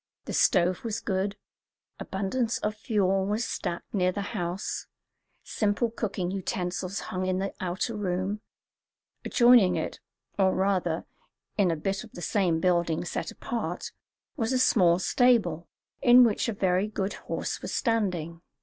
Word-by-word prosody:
The - - -5
stove 180 0 +3
was 225 -2 -2
good; 195 0 -2 0.6
abundance 220 +5 -1
of 210 - -2
fuel 200 -4 +1
was 215 +3 0
stacked 170 -3 -4
near 185 -3 +2
the 200 +2 -3
house; 180 -1 -3 0.6
simple 215 +2 0
cooking 195 -5 -3
utensils 185 0 -3
hung 185 0 -1
in 185 0 +1
the 195 +1 -2
outer 185 +5 -2
room; 195 +1 -2 0.8
adjoining 240 -6 +5
it, - - -3 0.4
or 190 -1 +4
rather, 185 -4 0 0.5
in 200 -4 +3
a 165 - +1
bit 195 +7 -2
of 225 - -14
the 175 - -8
same 180 -6 +1
building 170 -2 +1
set - - -3
apart, 185 -7 -4 0.4
was 225 -4 -1
a 260 - +2
small 180 -9 +4
stable, 185 - +2 0.3
in 245 +1 +8
which 230 0 +2
a - - -1
very 190 0 +1
good 205 -2 -2 0.2
horse - - -3
was - - -5
standing. 180 - -1
195 Hz, 145 wpm, -27 LUFS, 180-215 Hz, 0.8 s, in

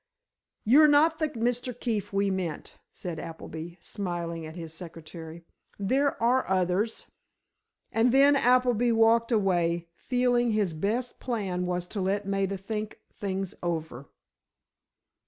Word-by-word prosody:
"You're 290 +8 +7
not 310 +2 +4
the 310 -1 +1
Mr. 245 -1 -2
Keefe 220 -5 -2
we 200 0 +1
meant," 180 -5 -4
said 175 -4 -6
Appleby, 165 +1 -7
smiling 170 -5 -4
at 160 - -10
his 165 -3 -7
secretary. 165 0 -9 0.3
"There 265 +8 +1
are 245 +1 +2
others." 190 +4 0 0.9
And 230 +2 +3
then 280 +2 +6
Appleby 245 -2 +3
walked 230 +1 +4
away, 175 -5 +1
feeling 245 +2 +1
his 205 -5 +1
best 220 +10 -2
plan 195 -7 -2
was 180 -1 -2
to 205 - -3
let 195 +2 0
Maida 195 0 -1
think 210 +2 -5 0.2
things 195 -2 -3
over. 160 -6 -4
200 Hz, 125 wpm, -28 LUFS, 175-240 Hz, 0.9 s, You're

